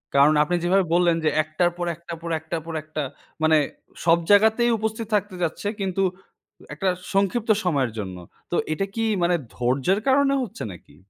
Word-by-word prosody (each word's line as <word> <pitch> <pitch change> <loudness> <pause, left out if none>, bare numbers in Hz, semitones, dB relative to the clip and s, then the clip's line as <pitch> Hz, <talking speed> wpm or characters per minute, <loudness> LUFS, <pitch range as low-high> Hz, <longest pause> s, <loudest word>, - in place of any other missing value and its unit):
কারণ 145 +2 +6
আপনি 175 +4 -1
যেভাবে 185 +1 +3
বললেন 175 -2 +3
যে - - +5
একটার 155 +3 +1
পর, 175 - -2
একটার 170 0 -8
পর, 170 - -5
একটার 160 +1 -4
পর, 165 - -6
একটা 155 -1 -4 0.4
মানে 155 0 +5 0.5
সব 170 0 +6
জায়গাতেই 220 +3 +5
উপস্থিত 220 0 -3
থাকতে 200 -2 -1
যাচ্ছে 165 +5 -2
কিন্তু 195 0 0 0.7
একটা 185 +5 0 0.2
সংক্ষিপ্ত 200 +4 +1
সময়ের 140 -9 +1
জন্য। 95 -4 -5 0.3
তো - - 0 0.2
এটা 195 +5 -1
কি 225 - 0 0.2
মানে 175 0 +3 0.2
ধৈর্যের 130 +11 +1
কারণে 275 +1 +4
হচ্ছে 240 -7 -5
নাকি? 85 -4 -14
175 Hz, 170 wpm, -24 LUFS, 155-200 Hz, 0.7 s, কারণ